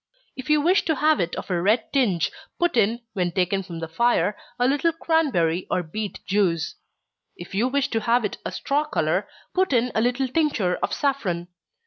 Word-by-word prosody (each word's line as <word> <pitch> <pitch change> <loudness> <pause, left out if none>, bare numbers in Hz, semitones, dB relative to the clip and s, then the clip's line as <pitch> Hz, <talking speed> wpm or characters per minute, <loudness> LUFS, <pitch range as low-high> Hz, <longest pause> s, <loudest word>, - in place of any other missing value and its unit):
If 260 +1 -8
you 300 -1 +4
wish 360 +6 +3
to 320 - +1
have 305 +2 +3
it 170 - -1
of - - -6
a 175 -1 +1
red 215 +6 +1
tinge, 200 - +2 0.3
put 345 -4 +1
in, 230 +1 +2
when 180 -3 0
taken 185 +2 +1
from 175 -3 -8
the 165 0 -4
fire, 210 +3 +2 0.2
a 245 0 +2
little 290 +5 +2
cranberry 270 - +1
or 180 - 0
beet 205 +6 -6
juice. 185 -5 +1 0.6
If 175 - -10
you 215 +6 +2
wish 275 +1 0
to 225 - 0
have 235 +1 +2
it 210 - -4
a - - -4
straw 290 +2 0
color, 305 - 0 0.3
put 375 -5 +1
in 245 0 +2
a 220 - +1
little 250 +3 +1
tincture 255 - +1
of - - -2
saffron. 190 - -1
235 Hz, 195 wpm, -24 LUFS, 180-280 Hz, 0.6 s, you